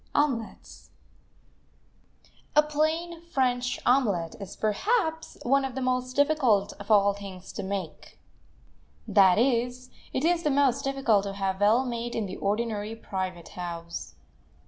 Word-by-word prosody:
OMELETS 265 -7 -2 1.7
A 300 - +7
plain 320 +3 -1
French 250 -6 0
omelet 205 -11 +2
is, 200 -2 -8
perhaps, 320 - 0
one 275 +3 +3
of 265 -2 -4
the 265 - -3
most 255 0 -1
difficult 265 -9 +3
of 200 - -10
all 200 -2 +5
things 195 -2 -9
to - - -4
make; 190 -4 -6 0.9
that 190 -3 +5
is, 245 +1 0 0.2
it 260 - -1
is 345 0 +3
the 300 - +1
most 275 -2 +2
difficult 270 -7 +2
to 200 - -4
have 195 0 -2
well 225 +6 +4
made 240 -1 -4
in 225 - -1
the 185 - -6
ordinary 210 +1 -2
private 185 -5 -5
house. 170 - -6
235 Hz, 135 wpm, -27 LUFS, 200-275 Hz, 1.7 s, A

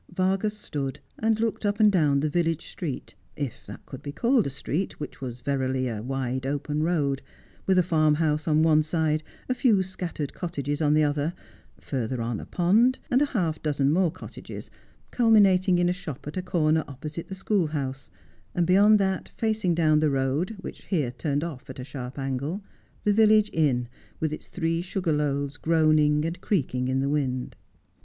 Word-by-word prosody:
Vargas 190 +4 0
stood 140 -9 -4 0.2
and 220 0 +2
looked 225 -1 -1
up 205 0 0
and 210 -1 +6
down 150 -7 +3
the 155 - +1
village 165 -1 0
street 150 -7 -5 0.2
— - - -36
if 120 - -15
that - - -10
could - - -9
be 145 - -5
called 235 - +2
a - - -1
street 140 +7 -3
which 150 - -7
was 125 -2 -6
verily 130 -1 0
a 110 -3 -3
wide 130 +1 -2
open 145 +2 -2
road, 150 -5 +1 0.5
with 190 -1 +4
a 180 - +5
farmhouse 155 -2 +2
on 155 0 +4
one 155 -1 +5
side, 155 -1 0 0.3
a 255 - +1
few 230 -6 +3
scattered 175 -6 -5
cottages 145 -4 -3
on 150 -1 +3
the 155 - +4
other, 145 +3 0 0.4
further 125 -2 -3
on 115 -1 -2
a - - -9
pond, 220 +9 +3
and 255 +2 +4
half 185 - 0
a - - -23
dozen 145 -2 +1
more 180 +2 +3
cottages, 185 - -9 0.4
culmi 225 -3 +5
nating 185 -2 +4
in 175 0 +3
a 180 - +2
shop 180 -7 -8
at 150 - -6
a 185 - -1
corner 160 -3 +1
opposite 150 +4 -7
the 190 - -6
schoolhouse, 155 -9 -1 0.5
and 175 - +2
beyond 200 +4 +6
that, 190 -2 -1
facing 220 -6 +1
down 155 -2 +4
the 155 -1 +3
road, 140 +9 0
which - - -9
here 150 -11 0
turned 145 +3 -2
off 140 -6 -7
at 130 - -8
a 130 - -5
sharp 130 -1 -7
angle, 140 +8 -3 0.4
the 210 - +3
village 215 0 +5
inn, 130 -6 +2 0.3
with 155 -1 -1
its - - -8
three 165 -1 -1
sugar 180 -2 -1
loaves 145 -1 -1
groaning 155 -2 +3
and 165 +2 -4
creaking 130 -9 0
in 130 +1 +1
the 135 - 0
wind. 130 -3 -1
155 Hz, 190 wpm, -26 LUFS, 140-185 Hz, 0.5 s, and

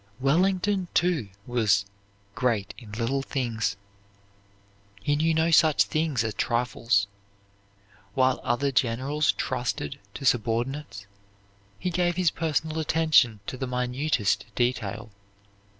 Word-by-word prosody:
Wellington, 185 +7 +2
too, 165 - +1 0.2
was 110 -5 +2 0.5
"great 120 -6 0
in 110 -4 -12
little 120 +5 -1
things." 115 -6 -2 1.2
He 145 +9 0
knew 160 +2 +2
no 160 +1 +2
such 160 -2 +5
things 155 -6 0
as 110 -1 -2
trifles. 115 -2 +1 1.1
While 130 -1 +2
other 140 +3 0
generals 135 +4 +1
trusted 125 - -3 0.2
to 135 - -6
subordinates, 120 0 -1 0.7
he 180 - -2
gave 175 0 +1
his 180 -3 +2
personal 160 0 -1
attention 155 -9 +3
to 130 - -5
the 130 - -3
minutest 125 -3 0
detail. 110 -3 -1
130 Hz, 110 wpm, -26 LUFS, 115-155 Hz, 1.2 s, such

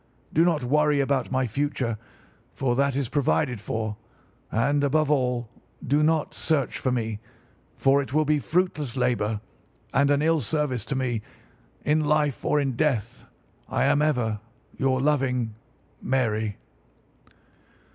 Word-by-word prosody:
Do 160 - +5
not 165 -5 +2
worry 150 +3 +3
about 135 -2 +1
my 130 0 +1
future, 125 -2 -2 0.6
for 125 -2 0
that 140 0 +1
is 140 -2 0
provided 120 - 0
for; 110 0 -3 0.5
and, 140 +6 +2
above 150 +1 +2
all, 125 -4 +1 0.4
do 145 +4 +2
not 155 0 +1
search 150 -6 0
for 130 - 0
me, 110 -4 -2 0.6
for 140 +1 +4
it 135 - -7
will 155 +2 +2
be 150 0 +2
fruitless 150 -4 -1
labour 110 -4 0 0.5
and 140 0 +3
an 145 +1 +3
ill 160 -1 +3
service 130 -3 -1
to 135 - -3
me. 125 -4 -1 0.6
In 155 +1 +3
life 150 -2 +1
or 150 - +2
in 135 -3 -1
death, 125 -5 -1 0.4
I - - +1
am 145 - +3
ever 120 -8 +1 0.4
your 130 -1 +1
loving, 130 -5 +1 0.5
"'MARY. 110 -5 0
135 Hz, 140 wpm, -25 LUFS, 120-150 Hz, 0.6 s, Do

